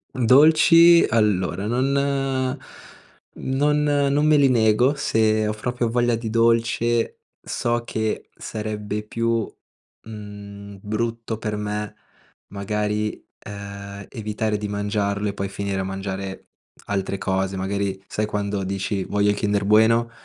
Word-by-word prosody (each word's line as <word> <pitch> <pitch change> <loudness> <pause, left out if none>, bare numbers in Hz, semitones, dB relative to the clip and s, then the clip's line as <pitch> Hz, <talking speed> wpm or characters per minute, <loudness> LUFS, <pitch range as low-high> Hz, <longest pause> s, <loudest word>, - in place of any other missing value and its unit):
Dolci, 160 +7 +6
allora 100 -4 +1
non 130 +4 +1 1.4
non 145 +3 0
non 145 0 +2
me 155 -1 +5
li 140 -2 +5
nego. 120 +3 +3
Se 110 -5 +1
ho 105 - -1
proprio 120 +2 -2
voglia 120 0 +2
di 115 -1 -4
dolce 115 0 +1 0.2
so 120 0 -2
che 110 -2 -3
sarebbe 105 -1 -4
più, 115 0 -1 0.6
mhmm, 100 -2 -10
brutto 115 +2 -3
per 105 -1 -3
me 105 0 -4 0.5
magari, 105 +1 -2 0.2
uhm, 100 -1 -8
evitare 110 -2 -2
di 105 0 -4
mangiarlo 105 0 -1
e 100 - -2
poi 100 - -3
finire 100 0 -3
a - - -1
mangiare 95 0 -5 0.4
altre 100 -1 -2
cose. 95 0 -1
Magari 95 0 -2
sai 105 - -2
quando 100 -1 -2
dici: 95 +1 -2
"Voglio 100 +2 +1
il 105 - +2
kinder 100 -1 0
bueno, 110 +3 +4
105 Hz, 125 wpm, -23 LUFS, 100-115 Hz, 1.4 s, Dolci